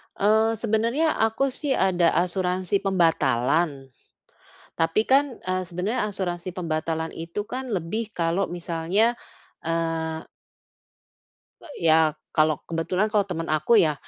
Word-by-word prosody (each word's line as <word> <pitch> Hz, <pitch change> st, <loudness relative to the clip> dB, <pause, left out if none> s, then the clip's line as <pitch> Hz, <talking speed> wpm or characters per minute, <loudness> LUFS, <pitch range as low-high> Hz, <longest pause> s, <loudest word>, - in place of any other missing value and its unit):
Eee, 220 Hz, +2 st, +3 dB
sebenernya 230 Hz, +8 st, 0 dB
aku 225 Hz, +5 st, +1 dB
sih 275 Hz, +1 st, -2 dB
ada 180 Hz, -6 st, +2 dB
asuransi 180 Hz, +1 st, 0 dB
pembatalan. 150 Hz, -5 st, +1 dB, 0.9 s
Tapi 165 Hz, +6 st, +2 dB
kan, 275 Hz, -1 st, +2 dB
eee, 185 Hz, 0 st, -2 dB
sebenernya 185 Hz, +7 st, -2 dB
asuransi 185 Hz, -3 st, -4 dB
pembatalan 160 Hz, -2 st, -2 dB
itu 170 Hz, +6 st, -5 dB
kan 255 Hz, -1 st, -5 dB
lebih 210 Hz, +5 st, -3 dB
kalau 170 Hz, +2 st, 0 dB
misalnya, 175 Hz, +7 st, 0 dB, 0.5 s
eee 165 Hz, -1 st, -1 dB, 1.4 s
Eee, 290 Hz, -, -8 dB
ya. 155 Hz, -1 st, +4 dB, 0.2 s
Kalo 155 Hz, -2 st, +2 dB
kebetulan 180 Hz, +6 st, -1 dB
kalau 205 Hz, -2 st, +3 dB
temen 165 Hz, -2 st, -3 dB
aku 155 Hz, +9 st, +3 dB
ya, 160 Hz, -7 st, +4 dB
180 Hz, 115 wpm, -25 LUFS, 165-215 Hz, 1.4 s, ya